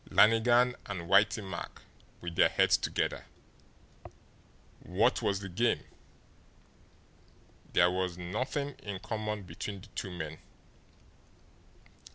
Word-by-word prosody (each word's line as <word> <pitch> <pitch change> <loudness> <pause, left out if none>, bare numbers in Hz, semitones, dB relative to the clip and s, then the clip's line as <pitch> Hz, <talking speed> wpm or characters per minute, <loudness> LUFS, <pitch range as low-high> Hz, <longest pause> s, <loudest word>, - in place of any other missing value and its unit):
Lannigan 120 +3 +5
and 100 -4 -4
Whitey 100 +5 +3
Mack - - -7 0.4
with 85 -1 -6
their - - +5
heads - - +4
together! - - -1 1.5
What - - +1
was 100 0 0
the 100 - -5
game? 115 +7 +1 1.9
There 85 +1 +5
was 90 -1 -2
nothing 125 - -2
in 100 -2 -5
common 105 +1 -4
between 95 +3 -6
the 105 - -14
two 95 - -4
men. 80 -3 -6
100 Hz, 105 wpm, -31 LUFS, 90-110 Hz, 1.9 s, Lannigan